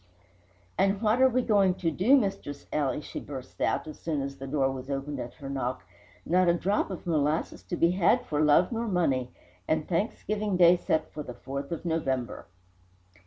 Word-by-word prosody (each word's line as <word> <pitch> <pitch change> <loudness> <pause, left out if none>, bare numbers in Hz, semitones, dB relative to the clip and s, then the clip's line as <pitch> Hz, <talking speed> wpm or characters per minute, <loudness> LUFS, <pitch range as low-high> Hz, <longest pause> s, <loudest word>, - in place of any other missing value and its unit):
"And 195 0 +3
what 225 +3 +2
are 260 - +7
we 255 0 +1
going 200 -5 +3
to 165 -3 -1
do, 220 - +4
Mistress 195 - -3
Ely?" 145 -1 0
she - - -6
burst 130 -3 -9
out, - - +1
as 155 - -9
soon 150 -4 -2
as 140 0 -6
the 135 - -7
door 135 -1 +1
was 130 0 -7
opened 140 +1 -3
at 120 - -6
her 140 - -9
knock. 130 -5 -3 0.4
"Not 180 +2 +3
a 170 - +4
drop 200 +4 0
of 190 - -7
molasses 155 -2 0
to - - -5
be 170 0 +3
had 180 -1 +2
for 150 -1 -1
love 155 +6 +4
nor 230 0 -2
money, 140 - +1 0.4
and 155 -1 0
Thanksgiving 205 +2 -1
Day 175 0 +7
set 160 -2 -1
for 150 - -5
the 125 -4 -8
4th 140 +3 -6
of 170 +1 -5
November!" 135 -8 -2
160 Hz, 195 wpm, -28 LUFS, 140-190 Hz, 0.4 s, are